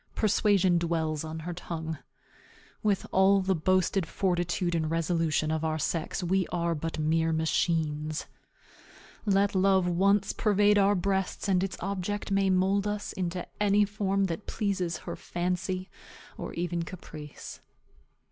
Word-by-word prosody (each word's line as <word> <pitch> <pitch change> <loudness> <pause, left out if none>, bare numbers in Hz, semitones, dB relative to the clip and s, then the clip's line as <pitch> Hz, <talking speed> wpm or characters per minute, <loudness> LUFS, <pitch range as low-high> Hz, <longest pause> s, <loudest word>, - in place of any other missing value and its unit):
Persuasion 195 -4 +3
dwells 160 -3 -1
on 160 0 -6
her 175 +2 -4
tongue. 160 -3 -5 0.8
With 205 -2 +1
all 195 +1 +5
the 190 0 +1
boasted 185 +1 +1
fortitude 175 -1 0
and 160 -2 0
resolution 165 -2 0
of 160 0 -1
our 155 -1 0
sex, 165 +3 -2
we 185 +1 +1
are 170 -1 -1
but 165 +1 -4
mere 160 +1 +1
machines. 160 -1 0 1.0
Let 200 0 +3
love 190 -1 +3
once 195 +3 +2
pervade 205 -1 +3
our 200 +1 +4
breasts, 190 +2 -1
and 185 -2 +2
its 195 -2 -3
object 200 +2 -3
may 195 -1 +3
mould 190 +2 +2
us 205 0 -3
into 180 -1 -3 0.2
any 205 0 +4
form 200 -1 0
that 190 +1 -3
pleases 190 -6 -1
her - - -4
fancy, 180 +1 -2 0.5
or - - -6
even 175 0 -1
caprice. 155 -4 -9
180 Hz, 140 wpm, -28 LUFS, 165-195 Hz, 1.0 s, all